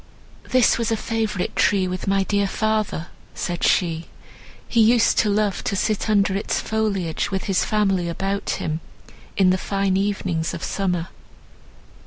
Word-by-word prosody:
"This 255 Hz, -2 st, +4 dB
was 230 Hz, -1 st, 0 dB
a 225 Hz, -, +1 dB
favourite 220 Hz, -4 st, -2 dB
tree 195 Hz, -3 st, +2 dB
with 185 Hz, +1 st, -4 dB
my 195 Hz, 0 st, +2 dB
dear 200 Hz, 0 st, +1 dB
father," 215 Hz, -5 st, -1 dB, 0.3 s
said 175 Hz, -1 st, -3 dB
she; 165 Hz, -2 st, +1 dB, 0.6 s
"he 230 Hz, -, +3 dB
used 230 Hz, +1 st, +4 dB
to 215 Hz, -, +3 dB
love 205 Hz, -2 st, 0 dB
to -, -, 0 dB
sit 215 Hz, +2 st, 0 dB
under 200 Hz, -2 st, +3 dB
its 200 Hz, -, -1 dB
foliage 205 Hz, -6 st, -1 dB
with 190 Hz, -1 st, -2 dB
his 195 Hz, -2 st, +1 dB
family 195 Hz, -5 st, +1 dB
about 195 Hz, +4 st, -2 dB
him, 155 Hz, +1 st, -3 dB, 0.6 s
in 190 Hz, -2 st, +5 dB
the 185 Hz, -, +1 dB
fine 195 Hz, -1 st, 0 dB
evenings 190 Hz, -4 st, -1 dB
of -, -, -7 dB
summer." 180 Hz, -3 st, -1 dB
195 Hz, 155 wpm, -22 LUFS, 185-215 Hz, 0.6 s, in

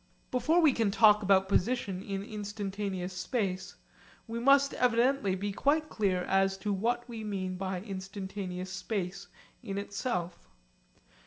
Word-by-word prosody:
Before 310 Hz, +7 st, +3 dB
we 305 Hz, -5 st, +5 dB
can 225 Hz, -4 st, +1 dB
talk 210 Hz, 0 st, +6 dB
about 195 Hz, -1 st, +4 dB
position 200 Hz, -1 st, 0 dB
in 195 Hz, 0 st, -4 dB
instantaneous 200 Hz, -3 st, -4 dB
space, 185 Hz, -1 st, -2 dB, 0.5 s
we 230 Hz, +1 st, -4 dB
must 275 Hz, +3 st, +5 dB
evidently 245 Hz, -3 st, +2 dB
be 200 Hz, +2 st, -3 dB
quite 305 Hz, +9 st, +1 dB
clear 190 Hz, -4 st, 0 dB
as 195 Hz, 0 st, +2 dB
to 205 Hz, +1 st, -2 dB
what 240 Hz, +5 st, -1 dB
we 230 Hz, -2 st, -6 dB
mean 190 Hz, -3 st, -3 dB
by 185 Hz, -1 st, -3 dB
instantaneous 190 Hz, -2 st, -5 dB
space 190 Hz, -1 st, -4 dB, 0.3 s
in 195 Hz, 0 st, -5 dB
itself. 200 Hz, -4 st, -3 dB
200 Hz, 135 wpm, -30 LUFS, 190-230 Hz, 0.5 s, talk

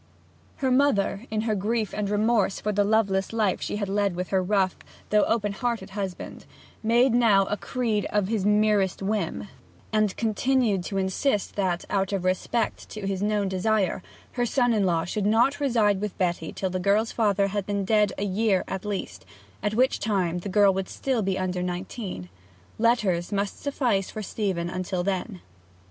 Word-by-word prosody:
Her 265 Hz, -2 st, 0 dB
mother, 250 Hz, -4 st, +2 dB
in 215 Hz, 0 st, -1 dB
her 220 Hz, -1 st, 0 dB
grief 215 Hz, +2 st, -1 dB
and 210 Hz, -1 st, -2 dB
remorse 210 Hz, -1 st, +2 dB
for 210 Hz, -, -1 dB
the 205 Hz, 0 st, +2 dB
loveless 200 Hz, -2 st, +1 dB
life 215 Hz, -4 st, 0 dB
she -, -, -3 dB
had 205 Hz, -1 st, -2 dB
led 200 Hz, -1 st, 0 dB
with 180 Hz, +1 st, -4 dB
her 190 Hz, -1 st, +2 dB
rough, 190 Hz, -1 st, +1 dB, 0.4 s
though 210 Hz, -1 st, +4 dB
open 210 Hz, -3 st, 0 dB
hearted, 220 Hz, -2 st, -3 dB
husband, 195 Hz, -2 st, -6 dB, 0.3 s
made 235 Hz, +3 st, +3 dB
now 220 Hz, -5 st, +4 dB
a 205 Hz, -, -1 dB
creed 225 Hz, -2 st, -1 dB
of 205 Hz, -2 st, +1 dB
his 215 Hz, -2 st, -1 dB
merest 210 Hz, -2 st, +2 dB
whim; 205 Hz, -1 st, -2 dB, 0.5 s
and 215 Hz, -2 st, +1 dB
continued 225 Hz, -3 st, +1 dB
to 195 Hz, -, -3 dB
insist 195 Hz, +4 st, 0 dB
that, 185 Hz, -3 st, -1 dB
out 195 Hz, 0 st, -1 dB
of 190 Hz, -2 st, -1 dB
respect 185 Hz, +5 st, -1 dB
to 215 Hz, -2 st, -6 dB
his 195 Hz, -1 st, -2 dB
known 205 Hz, -1 st, +1 dB
desire, 190 Hz, 0 st, 0 dB, 0.3 s
her 245 Hz, -1 st, 0 dB
son 245 Hz, -1 st, +2 dB
in 205 Hz, -3 st, +2 dB
law 165 Hz, -1 st, +1 dB
should 205 Hz, +3 st, -1 dB
not 235 Hz, +7 st, +3 dB
reside 220 Hz, -8 st, +2 dB
with 210 Hz, -2 st, -4 dB
Betty 175 Hz, -3 st, -1 dB
till 190 Hz, -1 st, -3 dB
the 185 Hz, -, -2 dB
girl's 205 Hz, +5 st, +2 dB
father 200 Hz, -3 st, +1 dB
had 200 Hz, -1 st, -3 dB
been 200 Hz, -1 st, -1 dB
dead 210 Hz, -1 st, +3 dB
a 200 Hz, -, -1 dB
year 200 Hz, 0 st, +1 dB
at 190 Hz, -1 st, -4 dB
least, 190 Hz, -, -4 dB, 0.4 s
at 210 Hz, +1 st, -1 dB
which 255 Hz, +3 st, +2 dB
time 185 Hz, -5 st, 0 dB
the 200 Hz, -, -6 dB
girl 200 Hz, 0 st, +5 dB
would 190 Hz, 0 st, -3 dB
still 260 Hz, -4 st, -1 dB
be 190 Hz, -1 st, -1 dB
under 185 Hz, -1 st, -2 dB
nineteen. 180 Hz, -, -5 dB, 0.5 s
Letters 215 Hz, -7 st, +2 dB
must 200 Hz, 0 st, -2 dB
suffice 245 Hz, -9 st, 0 dB
for 215 Hz, -, -6 dB
Stephen 185 Hz, -3 st, -2 dB
till 180 Hz, -1 st, -2 dB
then. 190 Hz, 0 st, -3 dB
205 Hz, 180 wpm, -26 LUFS, 190-220 Hz, 0.5 s, girl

